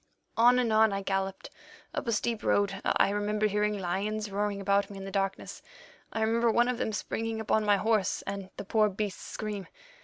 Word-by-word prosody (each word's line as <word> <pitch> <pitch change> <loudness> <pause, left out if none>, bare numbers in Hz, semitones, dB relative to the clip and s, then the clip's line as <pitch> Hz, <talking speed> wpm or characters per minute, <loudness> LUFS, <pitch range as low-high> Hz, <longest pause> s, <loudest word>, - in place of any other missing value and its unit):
"On 240 +2 +6
and 240 -3 +1
on 220 0 +5
I 195 0 -2
galloped 195 0 -2 0.4
up - - -3
a - - +2
steep 230 0 -1
road. 200 -1 +1
I 200 - +3
remember 210 +1 0
hearing 210 0 +1
lions 205 +3 -2
roaring 200 0 -1
round 200 +1 +2
me 200 - -9
in 195 - -7
the 195 - -6
darkness. 195 0 -2 0.5
I 220 - -2
remember 230 +2 +2
one 240 +2 +3
of 250 -1 -1
them - - -1
springing 225 +1 -3
upon 220 0 +1
my 205 -1 +4
horse 210 -1 +1
and 195 -1 -5
the - - -6
poor 215 +1 +3
beast's 205 0 -4
scream. 210 -3 -5
210 Hz, 195 wpm, -29 LUFS, 195-220 Hz, 0.5 s, On